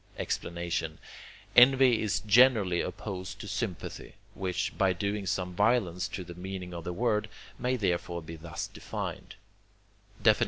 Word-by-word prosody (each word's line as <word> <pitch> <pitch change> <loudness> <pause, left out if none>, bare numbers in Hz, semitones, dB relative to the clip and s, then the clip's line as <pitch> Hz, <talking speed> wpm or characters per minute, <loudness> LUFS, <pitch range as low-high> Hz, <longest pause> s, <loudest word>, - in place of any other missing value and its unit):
Explanation 85 -2 -2 0.6
Envy 130 -1 +7
is 100 -2 0
generally 105 -4 +5
opposed 95 +2 -5
to 110 - -7
sympathy, 100 -4 -4 0.2
which, 95 +2 -2
by 95 -2 +3
doing 100 +2 -2
some 90 0 -1
violence 100 -3 +2
to 100 -1 -5
the 85 - -9
meaning 90 0 -6
of 85 -1 -6
the 90 - -3
word, 105 +2 0 0.3
may 125 +1 +1
therefore 85 -5 -1
be 80 +1 -8
thus 80 0 -5
defined: - - -6 0.9
XXIV. - - +6
95 Hz, 135 wpm, -30 LUFS, 90-110 Hz, 0.9 s, Envy